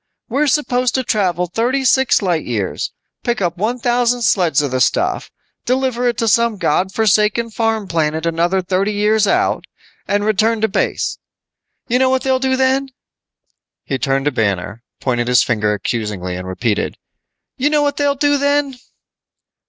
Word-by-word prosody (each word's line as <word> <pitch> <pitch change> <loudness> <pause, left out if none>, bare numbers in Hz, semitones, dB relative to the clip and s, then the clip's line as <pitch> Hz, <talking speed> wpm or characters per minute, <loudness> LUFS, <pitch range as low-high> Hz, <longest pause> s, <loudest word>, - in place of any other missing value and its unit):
We're 280 +6 +1
supposed 255 -3 +1
to 260 - +1
travel 185 -7 0
thirty 240 +9 -1
six 265 -3 +3
light 175 -5 0
years, 105 -6 -3 0.3
pick 240 -1 -1
up 175 -3 -1
one 220 +7 -1
thousand 245 0 +1
sleds 175 -10 +2
of 140 - -2
the 130 0 0
stuff, 370 - 0 0.3
deliver 255 -1 0
it 240 -2 0
to 230 - 0
some 230 0 +2
God 190 0 0
forsaken 220 +2 +2
farm 220 -2 -1
planet 160 -1 -1
another 170 +3 0
thirty 195 +3 0
years 210 +1 +2
out, - - +1 0.4
and 205 0 0
return 215 +2 +2
to 220 - +3
base. 200 - -1 0.7
You 250 +1 +1
know 260 0 +3
what 260 0 +1
they'll 265 -1 +1
do 260 0 +1
then?" 265 +1 +1 1.0
He 135 - -3
turned 135 +2 0
to 145 - +2
Banner, 100 -2 -2 0.2
pointed 120 -2 -1
his 125 -1 +4
finger 105 -3 0
accusingly 105 -4 -3
and 90 +1 -6
repeated, 105 +3 -2 0.6
"You 285 +3 +1
know 300 -1 +2
what 285 -1 -1
they'll 285 -1 +1
do 290 0 +2
then?" 285 -2 0
215 Hz, 165 wpm, -18 LUFS, 155-255 Hz, 1.0 s, his